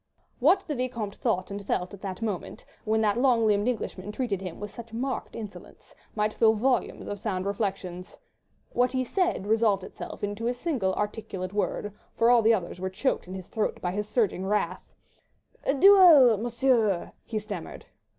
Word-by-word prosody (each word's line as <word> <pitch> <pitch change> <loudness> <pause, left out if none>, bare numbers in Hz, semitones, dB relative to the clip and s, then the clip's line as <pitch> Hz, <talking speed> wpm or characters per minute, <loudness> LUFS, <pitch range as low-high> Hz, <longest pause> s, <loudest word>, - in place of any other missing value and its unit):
What 340 +9 +5
the 305 - -3
Vicomte 235 -6 -3
thought 195 -7 -1
and 200 0 -5
felt 180 -1 -2
at 200 - -10
that 195 +2 -5
moment, 205 -5 -4 0.2
when 220 0 +2
that 215 +1 +2
long 245 -3 +3
limbed 210 +1 +2
Englishman 210 -5 -3
treated 210 -5 -2
him 185 -3 -7
with 205 0 -7
such 230 -1 -10
marked 260 +3 -3
insolence, 215 -3 -10 0.2
might 215 0 0
fill 220 -1 +4
volumes 250 +4 0
of 205 - -5
sound 190 -3 -2
reflections.... 195 -3 -4 0.6
What 245 +1 +2
he 260 0 +1
said 355 - 0
resolved 215 -3 +2
itself - - -9
into 205 +3 -2
a 245 - 0
single 245 - -1
articulate 205 -3 -4
word, 205 0 -2 0.2
for 230 +1 +5
all 240 -1 +6
the 225 +1 +5
others 185 -5 -1
were 190 +1 -2
choked 210 +2 -1
in 185 - -7
his 185 -2 -7
throat 220 +2 -2
by 175 - -2
his 210 +2 -3
surging 215 -5 +1
wrath— 195 -3 -1 0.7
"A 275 - +2
duel, 330 - +8
Monsieur," 235 -4 +1
he 220 - -4
stammered. 205 -5 -6
215 Hz, 180 wpm, -27 LUFS, 195-240 Hz, 0.7 s, duel